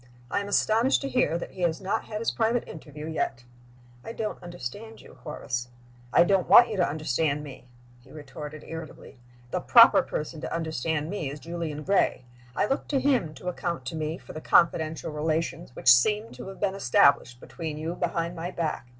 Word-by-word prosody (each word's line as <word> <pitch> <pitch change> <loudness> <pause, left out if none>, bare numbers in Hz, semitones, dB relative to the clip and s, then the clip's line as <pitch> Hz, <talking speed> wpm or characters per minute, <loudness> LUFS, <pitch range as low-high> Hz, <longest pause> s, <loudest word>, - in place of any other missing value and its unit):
I - - +1
am 200 - -5
astonished 225 +5 +3
to 275 - -3
hear 210 -10 +1
that - - -7
he 185 - -10
has 165 -2 +1
not 195 0 -2
had 210 - -5
his 230 - -1
private 230 +1 0
interview 150 -1 -9
yet." 145 -6 -3 0.6
"I 225 - -7
don't 220 -2 -4
understand 175 - -8
you, - - -16
Horace." 125 -5 -4 0.4
"I 170 - +6
don't 190 0 +1
want 240 - +9
you 215 - -3
to 180 - +2
understand 150 0 -1
me," 135 -3 -11 0.3
he 120 - -21
retorted, 150 0 -9
irritably. 160 -5 -9 0.3
"The - - 0
proper - - +7
person 155 +1 -5
to - - -5
understand 160 -1 -2
me 185 -9 -3
is 145 +2 -7
Julian 165 -2 -5
Gray. 190 -9 +1 0.3
I - - +2
look 270 +6 -2
to 280 - +1
him 250 - +1
to 180 - -10
account 170 -5 -3
to 130 - -4
me 155 +1 -3
for - - -12
the 155 - -7
confidential 160 -1 +2
relations 155 -3 -2
which 130 - +7
seem 210 - +2
to - - -9
have 195 - -9
been 200 -2 0
established 130 -6 +3
between 155 +2 -6
you 160 +2 -3
behind 170 0 -2
my 170 +1 -4
back. 155 -8 -3
165 Hz, 195 wpm, -27 LUFS, 150-195 Hz, 0.6 s, want